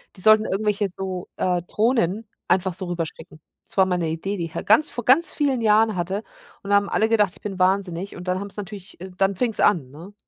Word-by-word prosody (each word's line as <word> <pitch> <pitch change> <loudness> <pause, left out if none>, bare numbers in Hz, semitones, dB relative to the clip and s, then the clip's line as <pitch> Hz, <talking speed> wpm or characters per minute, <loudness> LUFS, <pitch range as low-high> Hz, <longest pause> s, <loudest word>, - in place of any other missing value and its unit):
Die 185 - -8
sollten 215 +1 +6
irgendwelche 205 +1 0
so, 185 -1 -5
äh, 180 -1 0
Drohnen 220 -1 0 0.2
einfach 185 0 +1
so 185 +2 -4
rüberschicken. 160 -2 -6 0.3
Das - - -12
war 190 -1 +5
mal 180 -1 0
'ne 170 -2 -1
Idee, 190 +6 -3
die 170 - -2
ich 165 - -11
ha - - -2
ganz 225 +9 +4
vor 240 - -6
ganz 280 +9 +4
vielen 280 -4 0
Jahren 215 -1 +3
hatte. 190 +5 -2 0.4
Und 200 - -8
da 205 - +4
haben 200 0 0
alle 220 - +1
gedacht, 210 -5 +2
ich - - -17
bin 195 -3 -6
wahnsinnig. 185 0 0
Und 180 +1 -6
dann 185 +1 0
haben's 200 0 -5
natürlich 200 -3 -8
äh, 185 0 -8
dann 195 0 +2
fing's 230 +1 -1
an, 165 -11 +3
ne? 170 +8 -12
195 Hz, 235 wpm, -23 LUFS, 180-215 Hz, 0.4 s, sollten